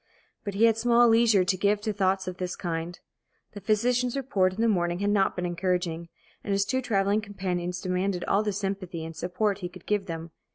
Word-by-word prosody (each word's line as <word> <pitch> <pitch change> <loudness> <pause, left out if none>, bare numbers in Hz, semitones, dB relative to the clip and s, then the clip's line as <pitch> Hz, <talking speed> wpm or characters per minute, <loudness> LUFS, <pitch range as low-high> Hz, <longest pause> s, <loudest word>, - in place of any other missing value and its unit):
But 200 -2 -5
he 210 - +2
had 225 -1 +5
small 240 +1 +5
leisure 225 -4 +5
to 185 0 +1
give 205 +2 +2
to 215 0 -2
thoughts 190 -1 0
of 185 -1 -5
this 180 -1 -3
kind. 170 0 -4 0.5
The 205 - -9
physician's 240 +5 +1
report 200 -9 +1
in 185 - -9
the 230 - +3
morning 175 -5 +1
had 200 +2 0
not 195 -2 +2
been 180 - -2
encouraging, 175 -1 -2 0.3
and 205 - -3
his 200 0 +2
two 260 +5 0
travelling 205 -3 +1
companions 180 -3 -3
demanded 185 -1 -1
all 200 - +2
the 215 -1 -1
sympathy 190 -4 -4
and 165 0 -8
support 190 +5 -1
he 180 -2 -5
could 180 -1 -14
give 205 -2 0
them. 165 -1 -6
195 Hz, 210 wpm, -27 LUFS, 180-210 Hz, 0.5 s, had